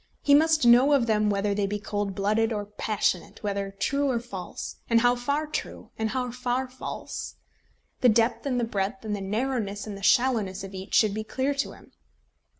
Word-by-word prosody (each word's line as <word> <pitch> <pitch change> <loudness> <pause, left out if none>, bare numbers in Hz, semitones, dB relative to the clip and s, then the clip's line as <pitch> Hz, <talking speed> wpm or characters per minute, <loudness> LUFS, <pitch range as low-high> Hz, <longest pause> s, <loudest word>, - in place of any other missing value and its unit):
He 285 - +4
must 310 -1 +5
know 245 +5 +7
of 270 -4 +4
them 215 -2 +2
whether 200 0 0
they 200 0 0
be 205 +1 -2
cold 205 -1 -3
blooded 215 +3 +1
or 205 -2 -2
passionate, 210 -2 -2
whether 200 -1 -2
true 280 +7 +1
or 245 -3 +1
false, 200 -6 -7
and 230 -1 +4
how 245 +1 +4
far 280 +5 -1
true, 305 - -6
and 220 0 -1
how 250 +1 -2
far 250 +1 -1
false. 255 +1 -6 0.6
The 250 - +5
depth 230 +4 +2
and 250 -2 0
the - - 0
breadth, 220 +2 -2
and 210 -1 -1
the 200 - -5
narrowness 210 0 -2
and 210 -2 -6
the 195 - -9
shallowness 215 -4 +2
of 195 0 -8
each 190 +1 -5
should 215 -3 +4
be 215 +1 -3
clear 265 +5 -1
to 280 0 -2
him. - - -17
225 Hz, 200 wpm, -26 LUFS, 205-255 Hz, 0.6 s, know